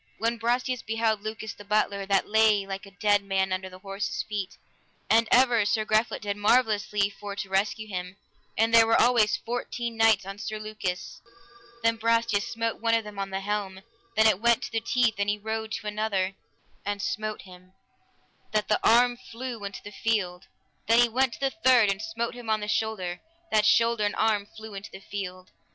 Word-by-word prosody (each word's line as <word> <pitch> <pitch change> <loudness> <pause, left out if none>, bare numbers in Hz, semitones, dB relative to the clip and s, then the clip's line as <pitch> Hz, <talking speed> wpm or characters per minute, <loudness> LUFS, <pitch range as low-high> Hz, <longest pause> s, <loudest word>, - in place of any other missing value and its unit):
When 230 +1 -1
Brastias 245 +2 0
beheld 220 -1 0
Lucas 220 0 -5
the 205 - -13
butler, 200 -1 0
that 195 -1 +2
lay 215 -2 +4
like 195 +1 -6
a - - -14
dead 205 -1 +3
man 190 -1 0
under 185 0 -3
the 185 - -12
horses' 195 +1 -4
feet, 205 -3 -4 0.5
and 225 +1 +5
ever 245 -3 +5
Sir 215 +1 0
Griflet 215 +1 +1
did 205 -1 -2
marvellously 210 -2 +2
for 200 0 -8
to 195 -1 -5
rescue 205 +3 0
him, 180 -1 -5 0.4
and 225 +1 +2
there 225 -1 +7
were 225 - +4
always 230 -3 +4
fourteen 235 -1 -4
knights 220 -3 +4
on 195 +1 -7
Sir 215 +1 -4
Lucas; 215 -4 -5 0.6
then 230 0 +2
Brastias 230 -2 +1
smote 230 -1 -3
one 230 0 +3
of 225 - +1
them 210 -1 -9
on 195 0 -3
the 190 0 -3
helm, 195 -1 -3 0.3
that 220 +1 +4
it 215 -3 +4
went 235 0 +3
to - - -5
the 225 - -1
teeth, 245 -2 +2
and 200 0 +1
he 205 - +1
rode 220 +1 -4
to - - -5
another 210 -3 -1 0.5
and 205 0 -3
smote 215 +1 -3
him, 185 0 -15 0.8
that 210 -1 0
the 210 - +3
arm 240 +1 +4
flew 235 -2 -6
into 200 0 -6
the 205 - -9
field. 190 -5 -1 0.4
Then 230 +1 +5
he 240 0 +5
went 255 +1 +1
to - - -10
the 270 -1 0
third 245 -5 +6
and 195 +1 -4
smote 230 +2 -3
him 245 -2 -9
on 215 -1 +1
the 210 - -4
shoulder, 210 -5 -2 0.3
that 210 -1 +4
shoulder 230 0 +3
and 205 - -1
arm 215 -2 +1
flew 220 -1 -9
in 195 0 -7
the - - -10
field. 185 -2 -7
215 Hz, 200 wpm, -27 LUFS, 200-230 Hz, 0.8 s, there